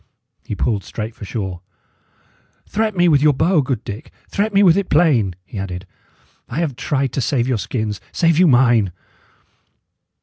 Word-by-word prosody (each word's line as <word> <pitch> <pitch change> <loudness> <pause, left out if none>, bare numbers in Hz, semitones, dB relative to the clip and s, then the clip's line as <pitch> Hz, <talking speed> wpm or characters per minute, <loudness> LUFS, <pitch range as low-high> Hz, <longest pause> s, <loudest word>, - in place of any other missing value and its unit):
He 105 - -5
pulled 105 -2 -1
straight 110 0 -6
for 105 - -10
shore. 95 -4 -5 1.1
"Threat 215 -2 -1
me 175 0 +4
with 145 -4 +4
your 150 0 +5
bow, 160 +3 +3
good 130 -4 -3
Dick; 105 +2 -8 0.2
threat 210 +2 -1
me 200 0 +4
with 170 -4 +6
it 200 -2 -1
plain," 135 - +3
he 105 - -7
added. 90 -1 -5 0.6
"I - - -6
have 160 -6 -1
tried 135 0 -1
to 135 - -1
save 125 0 0
your 125 -4 0
skins, 110 -2 -3
save 165 -1 +2
you 185 - +6
mine!" 120 - +4
130 Hz, 170 wpm, -19 LUFS, 105-165 Hz, 1.1 s, with